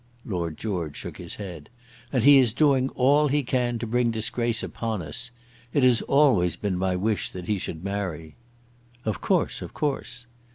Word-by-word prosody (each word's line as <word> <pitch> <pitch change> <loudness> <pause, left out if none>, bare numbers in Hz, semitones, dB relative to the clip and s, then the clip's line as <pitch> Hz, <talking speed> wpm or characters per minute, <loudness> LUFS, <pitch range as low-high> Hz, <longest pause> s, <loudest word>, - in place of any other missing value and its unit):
Lord 85 -6 -3
George 90 -9 -3
shook - - -7
his - - -6
head. 90 -7 -8 0.4
"And 125 -5 +1
he 140 0 +8
is 120 -5 +3
doing 135 -2 +3
all 145 +4 +4
he 145 +1 +1
can 125 -1 0
to 115 - -4
bring 120 +1 +1
disgrace 115 +1 -1
upon 110 -6 -3
us. 125 +10 -5 0.4
It 140 - +2
has 125 -3 +5
always 125 - +3
been 100 0 -2
my 95 0 0
wish 105 +3 0
that 90 -1 -8
he 105 0 0
should 80 -1 -6
marry." 95 -6 -4 0.7
"Of 110 -4 -2
course, - - 0
of - - -8
course." 125 -5 -3
110 Hz, 175 wpm, -25 LUFS, 90-125 Hz, 0.7 s, he